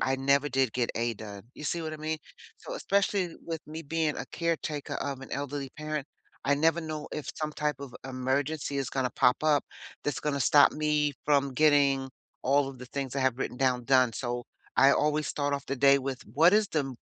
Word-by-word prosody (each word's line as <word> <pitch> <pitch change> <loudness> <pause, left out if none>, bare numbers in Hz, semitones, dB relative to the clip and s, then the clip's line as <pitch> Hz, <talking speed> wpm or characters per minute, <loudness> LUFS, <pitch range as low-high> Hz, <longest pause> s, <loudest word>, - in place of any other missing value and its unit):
I 130 - +1
never 140 +2 +2
did 130 -3 +1
get 125 -2 0
A 115 0 0
done. 100 -1 -9
You 150 - -9
see 170 +1 -1
what 155 -1 -4
I - - -5
mean? 155 +1 -3 0.4
So - - -7
especially 200 - 0
with 165 -2 -4
me 160 +2 -7
being 160 0 -1
a - - -4
caretaker 160 -3 -2
of 140 -2 -3
an 135 - -10
elderly 140 -1 -3
parent, 150 -2 -4 0.4
I 145 - +3
never 165 +3 +2
know 155 -2 -5
if 150 - -5
some 155 -1 -3
type 150 -2 -1
of 140 -3 -8
emergency 140 +3 -1
is 135 -2 -2
gonna 130 -2 0
pop 125 +4 +3
up 150 -2 +3 0.4
that's 145 - -1
gonna 145 -2 -1
stop 145 +4 +6
me 150 -1 +1
from 140 -2 +2
getting 140 -2 +4 0.3
all 140 +1 +3
of 135 - -9
the 125 - -9
things 135 0 -4
I - - +1
have 130 -1 +1
written 125 - -3
down 125 -2 +1
done. 130 -3 +4
So, 120 0 -3 0.3
I 135 +1 +7
always 150 0 +1
start 145 -1 -1
off 140 - -4
the 140 - -1
day 140 +1 +6
with 135 -1 -4
what 165 +6 +6
is 215 -1 +4
the 155 - +1
m 135 -2 -4
140 Hz, 215 wpm, -29 LUFS, 135-155 Hz, 0.4 s, I